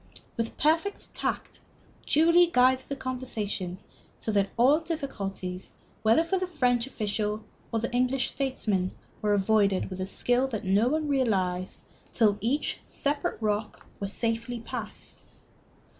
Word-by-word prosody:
With 230 Hz, 0 st, -3 dB
perfect 325 Hz, +7 st, +1 dB
tact -, -, -2 dB, 0.5 s
Julie 335 Hz, +3 st, +5 dB
guided 260 Hz, -3 st, +3 dB
the 280 Hz, -, -2 dB
conversation, 220 Hz, -9 st, -3 dB, 0.4 s
so 220 Hz, -, -3 dB
that 200 Hz, -1 st, +2 dB
all 265 Hz, +6 st, +5 dB
difficulties, 200 Hz, -, -5 dB, 0.3 s
whether 225 Hz, +8 st, +4 dB
for 375 Hz, +3 st, 0 dB
the 370 Hz, -, -2 dB
French 250 Hz, -7 st, +1 dB
official 210 Hz, -3 st, -2 dB, 0.3 s
or 230 Hz, -, 0 dB
the 235 Hz, -, -2 dB
English 255 Hz, +2 st, +1 dB
statesman, 210 Hz, -9 st, -1 dB, 0.3 s
were 210 Hz, -1 st, +2 dB
avoided 200 Hz, -1 st, +2 dB
with 185 Hz, 0 st, -5 dB
a 185 Hz, -, -2 dB
skill 245 Hz, +6 st, +2 dB
that 220 Hz, -6 st, -4 dB
no 200 Hz, +5 st, +3 dB
one 305 Hz, +3 st, 0 dB
realized 190 Hz, -10 st, 0 dB, 0.3 s
till 210 Hz, -3 st, +3 dB
each 260 Hz, +7 st, 0 dB
separate 285 Hz, +1 st, -1 dB
rock 210 Hz, -1 st, -2 dB
was 200 Hz, 0 st, -3 dB
safely 230 Hz, +2 st, -1 dB
passed. 230 Hz, -, -7 dB
230 Hz, 135 wpm, -28 LUFS, 205-270 Hz, 0.5 s, Julie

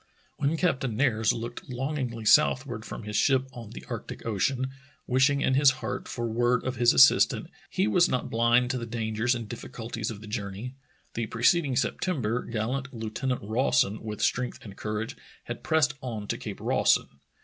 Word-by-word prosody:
When 145 Hz, +3 st, 0 dB
Captain 135 Hz, -10 st, 0 dB
Nares 110 Hz, -5 st, +3 dB
looked 120 Hz, +2 st, -6 dB
longingly 125 Hz, -3 st, -3 dB
southward 130 Hz, -4 st, +3 dB
from -, -, -7 dB
his 105 Hz, 0 st, -5 dB
ship 135 Hz, +3 st, +3 dB
on 115 Hz, -4 st, -9 dB
the -, -, -10 dB
Arctic -, -, -7 dB
Ocean, 130 Hz, +5 st, 0 dB, 0.3 s
wishing 135 Hz, +3 st, +3 dB
in 130 Hz, -, +2 dB
his 140 Hz, +1 st, +6 dB
heart -, -, -4 dB
for 120 Hz, -, -3 dB
word 120 Hz, +2 st, +1 dB
of 130 Hz, -1 st, -3 dB
his 120 Hz, +1 st, +5 dB
assistant, 130 Hz, -, +5 dB, 0.2 s
he 95 Hz, -, +1 dB
was 175 Hz, +12 st, +4 dB
not 130 Hz, -, -1 dB
blind 120 Hz, +2 st, +3 dB
to 130 Hz, -, -2 dB
the 115 Hz, -, -5 dB
dangers 115 Hz, +1 st, 0 dB
and 115 Hz, -2 st, -5 dB
diflBiCulties 115 Hz, 0 st, -5 dB
of 110 Hz, -3 st, -6 dB
the 110 Hz, -, -11 dB
journey. 105 Hz, +2 st, -5 dB, 0.4 s
The 115 Hz, -1 st, -2 dB
preceding 135 Hz, -, +2 dB
Septem 180 Hz, +5 st, 0 dB
ber 115 Hz, +1 st, -1 dB
gallant 125 Hz, +5 st, -3 dB
Lieutenant 115 Hz, +1 st, -3 dB
Rawson 110 Hz, -2 st, +1 dB
with 105 Hz, -1 st, -4 dB
strength 125 Hz, 0 st, 0 dB
and 100 Hz, -2 st, -9 dB
cour 105 Hz, +1 st, -3 dB
age 115 Hz, -, -8 dB, 0.3 s
had -, -, -6 dB
pressed 160 Hz, -4 st, +2 dB
on 110 Hz, -5 st, -5 dB
to -, -, -1 dB
Cape -, -, -6 dB
Rawson. 70 Hz, -, +2 dB
120 Hz, 180 wpm, -27 LUFS, 110-130 Hz, 0.4 s, his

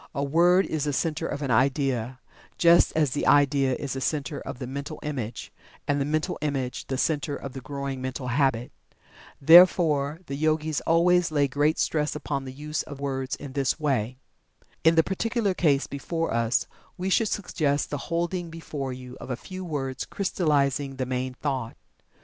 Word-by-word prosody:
A 140 Hz, -, -1 dB
word 175 Hz, +6 st, +4 dB
is 155 Hz, -2 st, -2 dB
the 145 Hz, -, -1 dB
center 160 Hz, +3 st, -1 dB
of 145 Hz, -, -4 dB
an 135 Hz, -, -1 dB
idea, 130 Hz, -1 st, +1 dB, 0.4 s
just 170 Hz, 0 st, +5 dB
as 150 Hz, -4 st, +2 dB
the 145 Hz, -, -1 dB
idea 140 Hz, -2 st, +4 dB
is 140 Hz, 0 st, -4 dB
the 135 Hz, -, -4 dB
center 145 Hz, 0 st, -2 dB
of 130 Hz, -1 st, -7 dB
the 130 Hz, -, -5 dB
mental 140 Hz, +4 st, -6 dB
image, 125 Hz, -7 st, -5 dB, 0.3 s
and 145 Hz, 0 st, +1 dB
the -, -, +1 dB
mental 155 Hz, +1 st, -1 dB
image 135 Hz, -4 st, -3 dB
the 135 Hz, -, -2 dB
center 145 Hz, 0 st, 0 dB
of 140 Hz, -1 st, -7 dB
the 135 Hz, -, -7 dB
growing 140 Hz, -1 st, -5 dB
mental 130 Hz, 0 st, -4 dB
habit. 125 Hz, -2 st, +1 dB, 0.7 s
Therefore, 160 Hz, -2 st, +6 dB
the 140 Hz, -, -6 dB
Yogis 155 Hz, +1 st, 0 dB
always 175 Hz, +1 st, +4 dB
lay 145 Hz, -2 st, +2 dB
great 145 Hz, +4 st, +1 dB
stress 150 Hz, -1 st, 0 dB
upon 140 Hz, -2 st, -3 dB
the 130 Hz, -, -6 dB
use 150 Hz, +3 st, -4 dB
of 145 Hz, -2 st, -9 dB
words 135 Hz, -1 st, -2 dB
in 140 Hz, -2 st, -9 dB
this 135 Hz, +2 st, 0 dB
way. 130 Hz, -5 st, -1 dB, 0.7 s
In 160 Hz, +1 st, +5 dB
the 160 Hz, -, +5 dB
particular 210 Hz, +2 st, -1 dB
case 145 Hz, -6 st, +2 dB
before 165 Hz, +3 st, -3 dB
us, 115 Hz, 0 st, +1 dB, 0.3 s
we 190 Hz, +1 st, -2 dB
should 225 Hz, +3 st, +3 dB
suggest 155 Hz, -7 st, -1 dB
the 145 Hz, -, -2 dB
holding 170 Hz, +1 st, -1 dB
before 150 Hz, -5 st, -5 dB
you 125 Hz, 0 st, -9 dB
of -, -, -8 dB
a 125 Hz, -, -1 dB
few 185 Hz, +7 st, -8 dB
words 135 Hz, -6 st, -3 dB
crystallizing 145 Hz, -7 st, 0 dB
the 130 Hz, -1 st, -2 dB
main 130 Hz, 0 st, -3 dB
thought. 130 Hz, -5 st, -3 dB
145 Hz, 180 wpm, -26 LUFS, 135-160 Hz, 0.7 s, Therefore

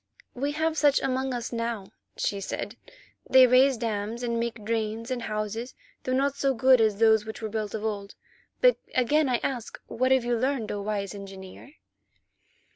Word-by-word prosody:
"We 280 Hz, +3 st, -2 dB
have 315 Hz, +1 st, 0 dB
such 290 Hz, -1 st, +4 dB
among 265 Hz, 0 st, -1 dB
us 240 Hz, -1 st, -4 dB
now," 230 Hz, -4 st, -3 dB, 0.3 s
she 200 Hz, -1 st, -1 dB
said. -, -, -5 dB, 0.5 s
"They 260 Hz, -1 st, +8 dB
raise 255 Hz, +1 st, +5 dB
dams 225 Hz, +1 st, -3 dB
and 235 Hz, -1 st, -1 dB
make 230 Hz, -2 st, -4 dB
drains 225 Hz, +1 st, -2 dB
and 250 Hz, -1 st, -2 dB
houses, 215 Hz, +3 st, -4 dB, 0.3 s
though 255 Hz, -, -1 dB
not 275 Hz, +1 st, +1 dB
so 275 Hz, -1 st, +1 dB
good 255 Hz, +1 st, +5 dB
as 215 Hz, -2 st, +2 dB
those 220 Hz, -1 st, +4 dB
which 220 Hz, 0 st, -7 dB
were 220 Hz, -, -4 dB
built 215 Hz, -1 st, -3 dB
of 220 Hz, 0 st, -4 dB
old. 205 Hz, -2 st, -4 dB, 0.5 s
But -, -, +5 dB, 0.2 s
again 280 Hz, +3 st, +3 dB
I 245 Hz, -, +2 dB
ask—what 255 Hz, 0 st, -2 dB
have 260 Hz, -2 st, +3 dB
you 240 Hz, 0 st, +1 dB
learned, 255 Hz, -3 st, -1 dB
O 205 Hz, -, -3 dB
wise 200 Hz, -1 st, -3 dB
Engineer?" 195 Hz, +6 st, -10 dB
235 Hz, 175 wpm, -27 LUFS, 215-260 Hz, 0.5 s, They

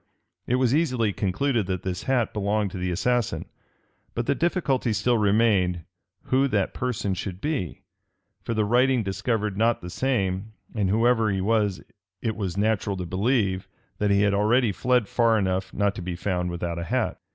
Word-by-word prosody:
It 125 Hz, -, +2 dB
was 130 Hz, -1 st, +2 dB
easily 125 Hz, -9 st, +1 dB
concluded 110 Hz, +3 st, 0 dB
that 90 Hz, -2 st, -3 dB
this 90 Hz, -2 st, -3 dB
hat 125 Hz, -4 st, +1 dB
belonged 105 Hz, -1 st, 0 dB
to 95 Hz, -, -6 dB
the 90 Hz, 0 st, -1 dB
assassin: 120 Hz, +6 st, 0 dB, 0.7 s
but 120 Hz, -, -1 dB
the -, -, +2 dB
difficulty 140 Hz, -, 0 dB
still 120 Hz, +3 st, +2 dB
remained, 100 Hz, -5 st, +2 dB, 0.4 s
who 135 Hz, +1 st, +2 dB
that 105 Hz, -7 st, 0 dB
person 120 Hz, -6 st, -2 dB
should 95 Hz, 0 st, -5 dB
be; 140 Hz, -, -3 dB, 0.6 s
for 115 Hz, -, -3 dB
the 110 Hz, -1 st, +2 dB
writing 125 Hz, +2 st, +3 dB
discovered 100 Hz, +1 st, -1 dB
not 115 Hz, +2 st, +2 dB
the 90 Hz, -, -7 dB
same; 100 Hz, -3 st, -1 dB, 0.2 s
and 100 Hz, -4 st, 0 dB
whoever 115 Hz, +1 st, +3 dB
he 95 Hz, -1 st, 0 dB
was, 105 Hz, -1 st, +1 dB, 0.4 s
it 110 Hz, -, -2 dB
was 95 Hz, -4 st, -3 dB
natural 105 Hz, -1 st, 0 dB
to 90 Hz, -, -4 dB
believe 95 Hz, 0 st, 0 dB, 0.3 s
that 105 Hz, -, +1 dB
he 100 Hz, 0 st, +4 dB
had 100 Hz, -1 st, +3 dB
already 110 Hz, +3 st, +3 dB
fled 125 Hz, +3 st, +1 dB
far 115 Hz, 0 st, +3 dB
enough 95 Hz, -2 st, -1 dB
not 100 Hz, -1 st, +1 dB
to 100 Hz, -, -7 dB
be 90 Hz, 0 st, -4 dB
found 90 Hz, -1 st, -1 dB
without 85 Hz, -1 st, -3 dB
a 85 Hz, -, -4 dB
hat. 125 Hz, +3 st, -1 dB
105 Hz, 175 wpm, -25 LUFS, 95-120 Hz, 0.7 s, he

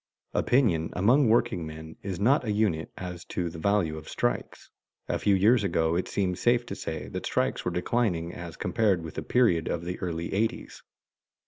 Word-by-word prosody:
Opinion 100 Hz, -, +2 dB
among 120 Hz, +7 st, +4 dB
workingmen 80 Hz, -9 st, 0 dB
is 95 Hz, -3 st, -4 dB
not 130 Hz, +8 st, +3 dB
a 110 Hz, -, -1 dB
unit 105 Hz, -7 st, 0 dB
as 90 Hz, -1 st, -6 dB
to 85 Hz, -2 st, -3 dB
the 80 Hz, -, -8 dB
value 90 Hz, -5 st, +1 dB
of 75 Hz, -, -12 dB
strikes. -, -, -3 dB, 0.4 s
A -, -, -1 dB
few 100 Hz, -, +3 dB
years 105 Hz, +4 st, +4 dB
ago 80 Hz, -3 st, +1 dB
it 90 Hz, -, -1 dB
seemed 90 Hz, -2 st, -1 dB
safe 120 Hz, +2 st, +3 dB
to -, -, -5 dB
say 80 Hz, -1 st, -5 dB
that -, -, -4 dB
strikes -, -, 0 dB
were -, -, 0 dB
declining 90 Hz, -4 st, 0 dB
as 85 Hz, -1 st, -8 dB
compared 100 Hz, -6 st, +1 dB
with 80 Hz, -, -7 dB
the -, -, -4 dB
period 90 Hz, -4 st, +2 dB
of 85 Hz, 0 st, -2 dB
the 90 Hz, +1 st, -4 dB
early 85 Hz, -2 st, -3 dB
eighties. 110 Hz, +3 st, -2 dB
90 Hz, 185 wpm, -27 LUFS, 80-110 Hz, 0.4 s, among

